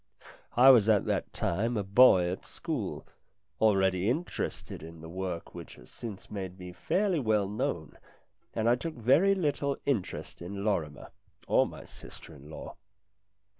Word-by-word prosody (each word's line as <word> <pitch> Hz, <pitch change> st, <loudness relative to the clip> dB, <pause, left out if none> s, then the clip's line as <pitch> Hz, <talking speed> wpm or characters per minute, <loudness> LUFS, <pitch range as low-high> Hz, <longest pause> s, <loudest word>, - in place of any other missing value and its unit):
I 130 Hz, +2 st, +9 dB
was 110 Hz, -4 st, +5 dB
at 105 Hz, -2 st, +4 dB
that -, -, -1 dB
time 115 Hz, +7 st, -1 dB
a 105 Hz, -, 0 dB
boy 95 Hz, -3 st, +6 dB
at 90 Hz, -, -6 dB
school, -, -, -5 dB, 0.5 s
already 95 Hz, -2 st, +3 dB
interested 160 Hz, +8 st, -3 dB
in 80 Hz, +1 st, -10 dB
the 80 Hz, -, -9 dB
work 90 Hz, -1 st, -5 dB
which 85 Hz, -2 st, -9 dB
has -, -, -16 dB
since 110 Hz, -5 st, -8 dB
made 95 Hz, -3 st, -5 dB
me 90 Hz, -1 st, -9 dB
fairly 180 Hz, -, 0 dB
well 110 Hz, -5 st, +1 dB
known, 90 Hz, -6 st, -3 dB, 0.6 s
and 115 Hz, 0 st, 0 dB
I 120 Hz, -, +6 dB
took 155 Hz, +6 st, -3 dB
very 145 Hz, -, +4 dB
little 145 Hz, -5 st, -1 dB
interest 110 Hz, -12 st, -3 dB
in 100 Hz, +3 st, -5 dB
Lorrimer 85 Hz, -9 st, -2 dB, 0.4 s
or -, -, +4 dB
my -, -, -10 dB
sister 80 Hz, -, -12 dB
in 75 Hz, 0 st, -14 dB
law. 80 Hz, -, -9 dB
105 Hz, 155 wpm, -29 LUFS, 90-125 Hz, 0.6 s, I